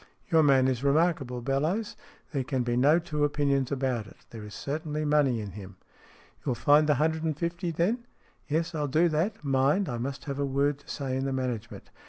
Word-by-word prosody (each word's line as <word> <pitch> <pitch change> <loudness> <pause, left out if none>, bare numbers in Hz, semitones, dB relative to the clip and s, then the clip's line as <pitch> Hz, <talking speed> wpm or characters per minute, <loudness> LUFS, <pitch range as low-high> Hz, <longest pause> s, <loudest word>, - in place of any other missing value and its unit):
Your 160 -1 +6
man 135 -3 +5
is 130 -1 -1
remarkable, 140 -4 +1
Bellowes. 155 - -1 0.4
There 140 -4 -1
can 130 0 -1
be 120 0 -1
no 140 +6 +5
two 160 -4 -2
opinions 140 -2 +1
about 130 -5 -1
it. - - -15
There 115 -2 -8
is 105 -1 -9
certainly 155 +1 -3
money 145 -5 +3
in 105 -2 -6
him." 100 -1 -10 0.3
" - - -27
You - - -32
will 125 - +1
find 150 +4 +4
the 150 - +5
hundred 160 +3 +1
and 155 -3 -1
fifty, 170 +2 -2
then? 210 +10 -1 0.2
" - - -34
"Yes, 165 +3 -1
I'll 150 -2 -1
do 160 +5 +3
that. 165 +5 -1
Mind, 140 +7 +2
I 120 -3 -3
must 135 +4 -4
have 140 -1 -4
a - - +1
word 140 +1 0
to - - -20
say 135 -3 -3
in 135 +1 -1
the 135 - -1
management. 125 -4 -4
140 Hz, 220 wpm, -28 LUFS, 130-160 Hz, 0.4 s, Your